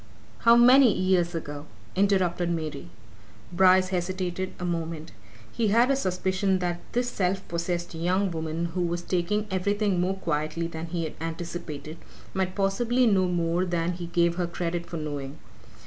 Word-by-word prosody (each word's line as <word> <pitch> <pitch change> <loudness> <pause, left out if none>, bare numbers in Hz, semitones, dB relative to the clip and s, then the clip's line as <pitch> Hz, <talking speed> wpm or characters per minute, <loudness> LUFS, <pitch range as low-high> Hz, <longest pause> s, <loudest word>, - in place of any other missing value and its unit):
"How 230 0 +6
many 250 +1 +7
years 185 -2 +1
ago?" 145 -2 -6 0.3
interrupted 185 -3 +2
Mary. 165 0 -4 0.6
Bryce 185 +1 +5
hesitated 185 0 -2
a 180 - -4
moment. 165 -2 -3 0.4
He 230 - 0
had 235 +6 +4
a - - +3
suspicion 190 -3 0
that 175 -1 -2
this 245 +1 +1
self 190 -4 -1
possessed 175 +1 -3
young 180 +4 0
woman 165 +1 -3
who 180 - -1
was 175 0 -1
taking 190 +5 0
everything 200 0 +1
more 185 +2 0
quietly 155 -1 -2
than 165 0 -5
he 170 0 -3
had 160 - -4
anticipated, 165 -2 -6 0.4
might 185 -1 -1
possibly 235 +6 +2
know 190 -5 +3
more 175 0 0
than 175 -1 0
he 175 -1 -6
gave 170 0 +1
her 175 -1 0
credit 170 0 -3
for 170 - -5
knowing. 145 -2 -5
175 Hz, 155 wpm, -26 LUFS, 170-190 Hz, 0.6 s, many